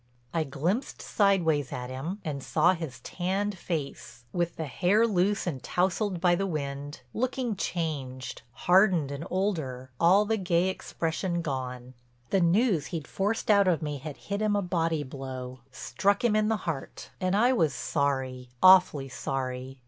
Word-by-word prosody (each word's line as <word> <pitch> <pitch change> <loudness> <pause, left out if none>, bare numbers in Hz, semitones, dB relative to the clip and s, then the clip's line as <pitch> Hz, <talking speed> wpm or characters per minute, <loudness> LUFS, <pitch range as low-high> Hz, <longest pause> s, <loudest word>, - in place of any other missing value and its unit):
I 165 - +1
glimpsed 165 - -2
sideways 165 -8 +2
at 125 -2 -5
him, 160 +11 -5
and 145 -3 -3
saw 165 +6 +3
his 160 -8 -6
tanned 195 +3 -2
face, 150 -8 -5
with 175 -1 -1
the 160 - -3
hair 185 - +3
loose 200 -1 +1
and 145 -8 -3
tousled 185 +1 0
by 175 0 +4
the 195 +3 0
wind, 145 -4 -4
looking 250 -2 -1
changed, 140 -8 -4 0.2
hardened 180 -6 +4
and 140 +3 -5
older, 155 -10 -2
all 190 +5 +5
the 220 +1 +1
gay 180 -2 +1
expression 170 -1 -2
gone. 130 -3 -4 0.4
The 195 - +3
news 175 - +3
he'd 160 -4 -5
forced 210 +3 0
out 200 -2 +5
of 165 -4 +2
me 145 -2 -3
had 150 +1 -7
hit 200 +1 -4
him 210 -1 +2
a 200 - +1
body 165 -3 0
blow, 130 -2 -7
struck 195 - 0
him 230 -3 +3
in 215 0 +3
the 220 0 +1
heart. 155 -5 -5
And 185 +1 +1
I 245 +4 +4
was 160 - +2
sorry, 130 -4 -1
awfully 180 -7 +7
sorry. 130 0 -4
170 Hz, 160 wpm, -28 LUFS, 140-195 Hz, 0.4 s, awfully